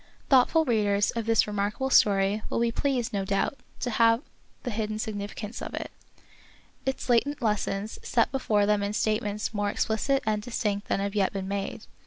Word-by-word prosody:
Thoughtful 275 +5 +5
readers 205 -4 +2
of 230 -1 -4
this 225 -2 +4
remarkable 210 +6 -2
story 200 -1 +4
will - - -1
be 235 0 +2
pleased, 250 -2 -1
no 200 -1 0
doubt, 195 +7 -1 0.2
to 245 - -1
have 230 +3 +4 0.4
the 245 - -3
hidden 215 0 -2
significance 210 0 -5
of - - -5
it, - - -5 1.0
its 265 0 -2
latent 265 +4 +2
lessons, 210 -2 -1
set 230 -2 +1
before 215 -6 +2
them 210 0 +2
in 200 +1 -2
statements 210 0 -1
more 205 -1 0
explicit 255 +6 0
and 215 -1 0
distinct 210 -3 -2
than - - 0
have 200 0 -2
yet 200 -3 +2
been 195 -1 -4
made. 200 0 -4
215 Hz, 175 wpm, -27 LUFS, 205-235 Hz, 1.0 s, Thoughtful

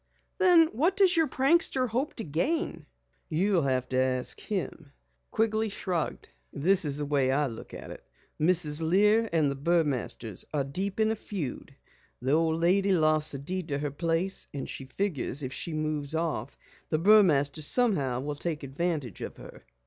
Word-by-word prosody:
"Then 350 -4 +6
what 330 - 0
does 380 -3 +5
your 325 -2 +3
prankster 270 0 +2
hope 255 +7 -2
to 225 - -4
gain?" 175 - -2 0.4
"You'll 180 +3 +2
have 130 -3 0
to 130 - -1
ask 130 -1 +1
him," 185 -5 -4
Joe - - -22 0.4
Quigley 220 0 0
shrugged. 180 - -3 0.2
"This 180 +4 +2
is 145 -1 0
the 150 - -2
way 140 -2 +1
I 145 +2 +2
look 115 -5 -8
at - - -9
it. - - -10 0.4
Mrs. 160 -2 +3
Lear 210 +7 +3
and 155 -4 +2
the - - -4
Burmasters 140 - -1
are 140 - +1
deep 190 +9 -3
in 220 0 +3
a - - -1
feud. 185 - -6 0.4
The 130 +2 -1
old 160 +1 +2
lady 190 +3 +3
lost 155 -3 +3
the - - -3
deed 175 +5 -5
to 140 -3 -2
her 145 0 -3
place 165 +5 -2
and 140 - -4
she 135 - -7
figures 145 -2 -3
if 130 0 -4
she 170 - -3
moves 155 -1 -3
off, 155 -6 -3 0.3
the 155 - +1
Burmasters 155 -6 +4
somehow 145 - +1
will 145 +2 -3
take 155 +1 -4
advantage 140 - -3
of - - -6
her." - - -12
160 Hz, 175 wpm, -28 LUFS, 140-200 Hz, 0.4 s, Then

